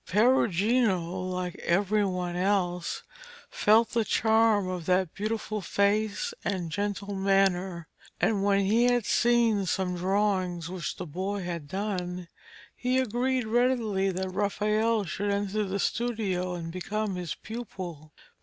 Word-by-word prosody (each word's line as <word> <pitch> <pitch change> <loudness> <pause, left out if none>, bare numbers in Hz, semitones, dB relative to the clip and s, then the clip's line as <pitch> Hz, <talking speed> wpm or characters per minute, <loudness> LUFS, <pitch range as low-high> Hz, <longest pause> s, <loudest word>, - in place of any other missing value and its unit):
Perugino, 220 -1 +3 0.3
like 180 -1 -3
every 205 +4 +1
one 180 -2 -2
else, 180 -2 0 0.5
felt 220 +2 +4
the 230 -2 +1
charm 220 -2 +3
of 180 -3 -4
that 185 -2 +2
beautiful 215 0 -3
face 210 - 0
and 180 -5 -2
gentle 205 +1 -2
manner, 190 -3 +1 0.3
and 205 -3 +1
when 200 0 +3
he 225 +5 +3
had 245 -3 +2
seen 230 -5 +3
some 180 +1 0
drawings 185 -2 0
which 180 -3 -4
the 180 - -6
boy 190 +5 -3
had 170 -4 -5
done, 180 -1 -3 0.5
he 250 +1 0
agreed 255 0 0
readily 225 -4 +1
that 190 0 -2
Raphael 210 +3 +1
should 200 +4 -2
enter 205 +1 0
the 195 0 -2
studio 200 -6 -1
and 165 -1 -5
become 205 +3 -3
his 175 -5 -4
pupil. 185 -9 -7
200 Hz, 130 wpm, -28 LUFS, 180-220 Hz, 0.5 s, felt